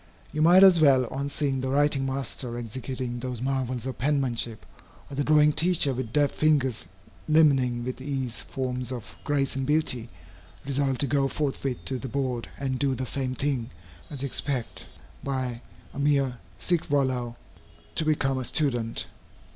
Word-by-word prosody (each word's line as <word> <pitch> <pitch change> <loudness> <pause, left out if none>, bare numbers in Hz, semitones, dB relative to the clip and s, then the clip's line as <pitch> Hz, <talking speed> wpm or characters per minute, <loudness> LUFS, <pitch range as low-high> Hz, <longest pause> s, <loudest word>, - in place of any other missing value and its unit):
You 155 - -1
might 175 +4 +7
as 185 -4 +8
well, 135 -4 +6
on 140 +1 -3
seeing 140 -2 -1
the 130 - -2
Writing 140 -1 +2
Master 130 -2 -3
executing 120 +1 -4
those 125 -1 -4
marvels 130 -1 -2
of 130 - -5
penmanship, 125 -5 -1 0.5
or - - -5
the 145 - 0
Drawing 150 0 +5
Teacher 165 -4 +3
with 125 -3 -4
deft 145 +2 +2
fingers 140 -6 +1 0.4
limning 135 -6 +4
with 130 +1 -5
ease 130 -4 -3
forms 125 -1 -3
of 120 -4 -5 0.2
grace 140 -2 0
and 135 - -1
beauty, 130 -5 0 0.6
resolve 135 -1 0
to 140 - +2
go 140 0 +2
forthwith 135 -2 -3
to 130 -1 -2
the 135 - -5
board 130 -2 -2
and 130 -2 -2
do 140 -2 +1
the 130 +1 -3
same 130 0 -2
thing, 130 -3 -1 0.4
as 140 -2 -6
expect, 135 -2 -2 0.4
by 130 -3 -2 0.3
a - - -6
mere 140 -4 +2 0.2
sic 175 -2 0
volo, 130 -5 0 0.6
to - - 0
become 135 -4 +1
a - - -3
student. 120 -3 0
135 Hz, 160 wpm, -27 LUFS, 125-145 Hz, 0.6 s, as